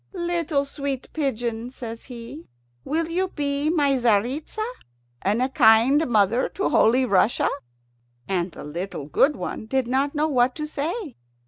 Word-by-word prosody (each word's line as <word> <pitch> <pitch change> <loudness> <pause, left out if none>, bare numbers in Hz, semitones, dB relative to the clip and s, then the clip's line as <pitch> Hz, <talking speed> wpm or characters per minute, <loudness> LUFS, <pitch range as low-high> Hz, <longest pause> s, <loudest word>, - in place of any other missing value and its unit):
"Little 340 -5 0
sweet 280 -2 -4
pigeon," 240 -5 -2
says 230 -3 -8
he, 230 - -9 0.4
"will 320 +2 -1
you 360 +3 0
be 285 -3 -1
my 295 -4 +2
Tzaritza, 250 - 0 0.6
and 210 +6 +1
a 260 - 0
kind 260 +3 +5
mother 220 +1 +2
to 395 - 0
Holy 250 +4 +4
Russia?" 210 +1 +2 0.8
And 180 -1 -1
the - - -10
little 165 0 -5
good 275 - +3
one 220 - -5
did 265 +1 0
not 275 +4 0
know 300 +1 +2
what 250 -3 +2
to 305 - -4
say. 310 - -4
265 Hz, 145 wpm, -24 LUFS, 225-300 Hz, 0.8 s, kind